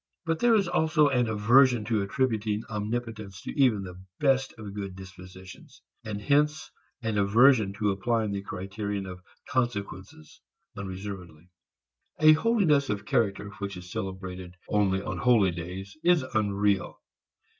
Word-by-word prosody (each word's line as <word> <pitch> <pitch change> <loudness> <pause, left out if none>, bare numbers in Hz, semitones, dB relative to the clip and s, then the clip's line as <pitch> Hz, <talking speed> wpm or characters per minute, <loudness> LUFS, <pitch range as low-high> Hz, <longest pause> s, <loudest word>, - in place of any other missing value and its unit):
But 165 0 -1
there 240 -1 +4
is 200 -4 +2
also 155 -3 +3
an 125 -3 +1
aversion 120 +2 +4
to 110 -2 0
attributing 110 -1 -1
omnipotence 110 -2 -4
to - - -5
even 125 -8 +2
the 95 0 -10 0.2
best 135 -2 +2
of 105 -3 -8
good 100 -2 -6
dispositions, 95 0 -12 0.2
and 105 -2 -5
hence 150 +6 +1 0.3
an 110 -2 0
aversion 110 +1 +4
to 105 0 0
applying 110 +2 -1
the 100 0 -3
criterion 100 +1 -5
of 90 -1 -9 0.3
consequences 100 - -4 0.3
unreservedly. 95 -3 -8 0.7
A 155 0 +8
holiness 160 -7 +2
of 105 -2 -3
character 100 -2 0
which 100 -1 -5
is 90 0 -10
celebrated 95 -3 -6
only 95 -2 +1
on - - -4
holy 115 -7 +4
days 90 +3 -7
is 175 -4 +4
unreal. 100 -2 0
105 Hz, 135 wpm, -27 LUFS, 95-125 Hz, 0.7 s, A